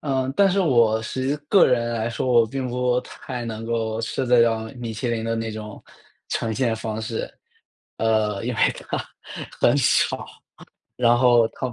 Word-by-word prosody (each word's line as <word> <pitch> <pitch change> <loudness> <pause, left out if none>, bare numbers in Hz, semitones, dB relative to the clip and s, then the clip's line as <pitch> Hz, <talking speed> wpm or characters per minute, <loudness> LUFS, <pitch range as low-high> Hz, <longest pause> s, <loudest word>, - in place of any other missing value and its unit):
嗯， 135 -2 -1
但 200 -1 +5
是 195 - 0
我 120 - +3
实 130 +4 -3
际 145 - 0
个 200 - +6
人 120 -2 +1
来 115 0 -2
说， 115 - -3
我 120 -2 +5
并 130 +3 -4
不 125 0 0
太 125 -3 -7
能 115 -1 -5
够 115 -1 -2
吃 125 +3 -2
得 125 -1 +5
了 115 -1 +2
米 120 -2 -6
其 110 +3 -3
林 115 -1 -2
的 115 0 -1
那 115 -1 -3
种 105 -1 -8 0.5
呈 110 -1 -1
现 115 -1 0
方 110 0 -4
式。 110 0 -4 0.7
呃， 110 -2 +1
因 125 - -1
为 - - -7 0.3
它 - - 0 0.6
很 - - +4
少， - - +2 0.7
然 120 0 +4
后 120 -2 +5
它 130 +1 -5
115 Hz, 195 characters per minute, -23 LUFS, 110-125 Hz, 0.7 s, 个